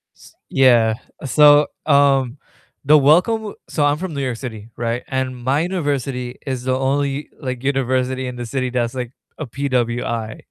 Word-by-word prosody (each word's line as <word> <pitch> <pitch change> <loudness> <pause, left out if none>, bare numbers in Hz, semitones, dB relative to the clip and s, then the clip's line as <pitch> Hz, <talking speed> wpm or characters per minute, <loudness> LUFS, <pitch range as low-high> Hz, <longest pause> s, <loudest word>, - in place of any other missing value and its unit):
S - - -18
yeah, 120 -4 +4 0.3
so, 145 +1 +6 0.2
um, 140 -3 +3 0.5
the 150 +2 +7
welcome 190 - +3
so 150 - -1
I'm 145 +1 +2
from 180 0 -5
New 140 - -3
York 125 -3 -2
City, 110 -4 -8
right, 120 +1 -2
and 130 -1 -2
my 130 +4 0
university 140 -8 -2
is 130 -2 -3
the 130 0 0
only, 140 +2 -1
like, 130 -3 -5
university 130 -1 0
in 125 - -6
the 120 -1 -5
city 130 +1 -2
that's, 120 -1 -1
like, 125 -2 -4 0.3
a 155 - -4
PWI, 120 -4 -2
130 Hz, 160 wpm, -20 LUFS, 125-145 Hz, 0.5 s, the